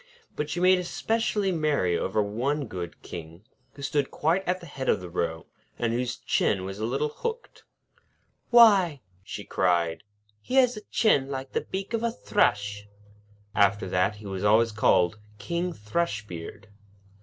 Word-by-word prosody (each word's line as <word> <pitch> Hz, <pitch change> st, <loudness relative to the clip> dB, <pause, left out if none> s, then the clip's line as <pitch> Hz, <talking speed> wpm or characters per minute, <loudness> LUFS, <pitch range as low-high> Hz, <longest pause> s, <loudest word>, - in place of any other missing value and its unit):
But 150 Hz, 0 st, -3 dB
she 175 Hz, -, -2 dB
made 185 Hz, 0 st, +4 dB
specially 220 Hz, -3 st, 0 dB
merry 150 Hz, -, +1 dB
over 105 Hz, +4 st, 0 dB
one 130 Hz, +8 st, -1 dB
good 90 Hz, -6 st, -7 dB
King, 85 Hz, +2 st, -9 dB, 0.3 s
who 140 Hz, -, -10 dB
stood 140 Hz, 0 st, 0 dB
quite 170 Hz, +5 st, +1 dB
at 180 Hz, +1 st, 0 dB
the 175 Hz, -, -11 dB
head 135 Hz, -4 st, -4 dB
of -, -, +3 dB
the 90 Hz, -1 st, -9 dB
row, 80 Hz, -2 st, -2 dB, 0.3 s
and 115 Hz, -1 st, 0 dB
whose 125 Hz, +1 st, -2 dB
chin 95 Hz, -1 st, 0 dB
was 95 Hz, +1 st, -6 dB
a 110 Hz, -, -1 dB
little 140 Hz, +5 st, 0 dB
hooked. 465 Hz, -, -6 dB, 0.8 s
'Why!' 200 Hz, -, +6 dB, 0.2 s
she 100 Hz, +1 st, -7 dB
cried, 85 Hz, -4 st, +1 dB, 0.4 s
'he 255 Hz, -, -4 dB
has 250 Hz, -2 st, +5 dB
a 210 Hz, -, -7 dB
chin 140 Hz, -, +3 dB
like 135 Hz, -1 st, -5 dB
the -, -, 0 dB
beak 195 Hz, +4 st, -5 dB
of 230 Hz, -, 0 dB
a 235 Hz, -, +1 dB
thrush.' 105 Hz, -, 0 dB, 0.7 s
After 100 Hz, -1 st, +3 dB
that, 90 Hz, +4 st, +1 dB
he 105 Hz, 0 st, -13 dB
was 95 Hz, -1 st, -4 dB
always 110 Hz, +3 st, +4 dB
called 105 Hz, -3 st, +2 dB, 0.2 s
'King 170 Hz, -, -2 dB
Thrushbeard.' 105 Hz, -, -4 dB
125 Hz, 160 wpm, -27 LUFS, -, 0.8 s, Why